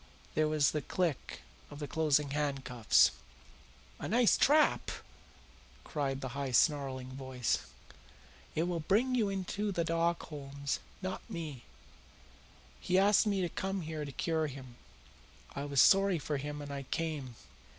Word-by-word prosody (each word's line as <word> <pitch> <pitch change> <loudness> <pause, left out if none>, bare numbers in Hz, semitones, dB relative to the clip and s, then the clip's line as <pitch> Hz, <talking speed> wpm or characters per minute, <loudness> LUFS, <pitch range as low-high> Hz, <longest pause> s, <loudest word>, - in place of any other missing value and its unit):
There 155 0 +2
was 155 -1 +3
the 150 - -1
click 165 0 -2 0.3
of 145 - -10
the 145 -1 -5
closing 150 -1 +2
handcuffs. 135 -5 +3 0.9
"A - - -4
nice 235 0 +4
trap!" 300 +2 +4 0.9
cried 135 -3 -2
the 130 - -4
high, 140 +1 -3
snarling 135 -1 +2
voice. 130 -2 -2 0.9
"It 160 - +2
will 175 -1 -1
bring 215 +11 +2
YOU 225 -5 +2
into 195 +2 -2
the 175 -3 0
dock, 165 +1 0
Holmes, 140 -2 -4 0.2
not 185 0 -3
me. 155 - -6 1.1
He 185 - +1
asked 205 +3 +5
me 200 -2 +1
to 175 - 0
come 190 +2 -3
here 155 -1 -4
to 140 - -6
cure 160 +3 0
him. 130 -3 -9 0.8
I 140 - -3
was 140 -2 0
sorry 195 +2 +6
for 150 -1 -2
him 145 +1 -5
and 145 - -7
I 140 - -4
came. 150 -7 -3
150 Hz, 145 wpm, -32 LUFS, 140-180 Hz, 1.1 s, sorry